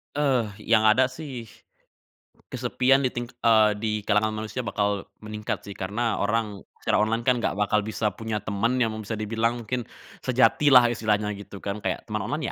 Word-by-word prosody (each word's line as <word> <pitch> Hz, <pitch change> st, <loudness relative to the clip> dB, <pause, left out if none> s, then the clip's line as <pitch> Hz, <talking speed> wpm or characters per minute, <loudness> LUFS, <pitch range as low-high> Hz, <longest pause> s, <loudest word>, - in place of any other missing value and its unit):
Eee, 135 Hz, -6 st, +2 dB, 0.2 s
yang 110 Hz, -1 st, +5 dB
ada 130 Hz, +4 st, +5 dB
sih 130 Hz, -6 st, -8 dB, 1.0 s
kesepian 130 Hz, +2 st, +2 dB
di 130 Hz, -, +2 dB
ting 120 Hz, 0 st, -4 dB, 0.2 s
eee, 110 Hz, -2 st, +6 dB
di 110 Hz, 0 st, -1 dB
kalangan 110 Hz, +1 st, +2 dB
manusia 120 Hz, +4 st, -4 dB
bakal 105 Hz, -4 st, -1 dB, 0.2 s
meningkat, 105 Hz, 0 st, -4 dB
sih, 100 Hz, -, -7 dB
karena 110 Hz, +5 st, -2 dB
orang 105 Hz, -1 st, -1 dB, 0.2 s
secara -, -, +2 dB
online 115 Hz, +2 st, +1 dB
kan 125 Hz, -1 st, +3 dB
enggak -, -, 0 dB
bakal 105 Hz, +1 st, +2 dB
bisa 105 Hz, 0 st, -2 dB
punya 110 Hz, +1 st, -4 dB
temen 110 Hz, +5 st, 0 dB
yang 115 Hz, -3 st, +1 dB
emang 110 Hz, -1 st, -7 dB
bisa 110 Hz, -, -3 dB
dibilang 115 Hz, +2 st, -1 dB
mungkin 120 Hz, +1 st, -3 dB, 0.3 s
sejati 130 Hz, +3 st, +3 dB
lah 125 Hz, -3 st, +8 dB
istilahnya, 105 Hz, -2 st, 0 dB
gitu, 100 Hz, -1 st, -10 dB
kan, 100 Hz, +1 st, -4 dB
kayak -, -, -3 dB
teman -, -, -3 dB
online -, -, -2 dB
110 Hz, 175 wpm, -25 LUFS, 105-120 Hz, 1.0 s, lah